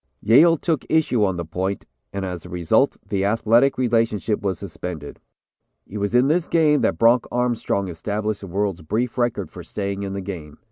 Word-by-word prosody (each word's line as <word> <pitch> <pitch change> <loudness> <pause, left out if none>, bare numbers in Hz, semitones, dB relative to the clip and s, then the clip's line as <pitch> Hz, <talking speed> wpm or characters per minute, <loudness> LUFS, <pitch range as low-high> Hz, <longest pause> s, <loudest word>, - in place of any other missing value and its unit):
"Yale 160 +10 +6
took 160 -3 -1
issue 150 -8 +2
on 95 -3 0
the 85 - -4
point, 95 +4 -3 0.3
and 100 -1 -4
as 90 -3 -5
a - - -11
result 85 -2 +1
the 95 -1 -1
athletic 115 +6 +3
relationship 115 -4 0
was 95 -4 -1
suspended. 85 -5 -7 0.7
"It 105 - -7
was 100 +3 -1
in 125 +2 +5
this 165 +3 +1
game 155 -3 +3
that - - +1
Bronc 115 +1 +4
Armstrong 120 -5 0
established 105 +4 -3
the 100 - -8
world's 95 -1 -2
brief 110 +9 -2
record 120 -1 -1
for - - -9
staying 100 -1 -4
in 100 -1 -4
the 100 - -4
game. 85 -6 -7
105 Hz, 185 wpm, -22 LUFS, 95-120 Hz, 0.7 s, Yale